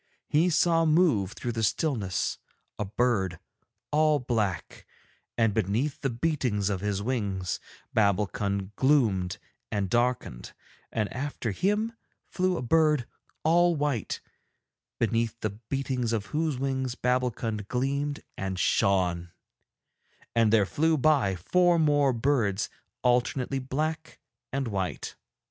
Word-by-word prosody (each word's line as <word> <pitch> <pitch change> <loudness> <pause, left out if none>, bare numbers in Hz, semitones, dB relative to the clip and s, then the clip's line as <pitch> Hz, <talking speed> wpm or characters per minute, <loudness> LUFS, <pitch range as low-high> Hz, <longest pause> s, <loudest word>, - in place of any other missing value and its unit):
He 160 +4 +3
saw 165 0 +3
move 155 - +3
through 120 - -4
the 115 -1 -3
stillness 110 - 0 0.4
a 105 - -1
bird 100 -4 0 0.5
all 155 0 +4
black, 115 -8 -2 0.5
and 115 -3 +3
beneath 110 +8 0
the 135 - 0
beatings 120 -6 0
of 95 -2 -2
his 100 -1 -1
wings 100 -7 -2 0.4
Babbulkund 100 -1 0
gloomed 105 -9 +2 0.3
and 100 -3 -1
darkened; 120 - -1 0.4
and 110 -2 0
after 130 -4 -3
him 210 - 0 0.3
flew 185 -1 0
a - - -3
bird 150 -1 +3 0.4
all 175 +2 +4
white, 145 -7 -1 0.8
beneath 115 0 0
the 110 - -1
beatings 125 +2 -2
of 105 -2 -1
whose 155 -3 0
wings 130 -2 -1
Babbulkund 120 -5 -1
gleamed 140 +4 -1
and 95 -1 -3
shone; 90 -3 +1 1.0
and 115 -2 +3
there 110 -3 +5
flew 160 +9 +1
by 135 -9 +3
four 175 - +3
more 145 -3 +3
birds 115 -5 0 0.3
alternately 125 +2 +1
black 155 +5 -3 0.3
and 135 -1 -1
white. 95 -4 -3
125 Hz, 120 wpm, -28 LUFS, 105-145 Hz, 1.0 s, there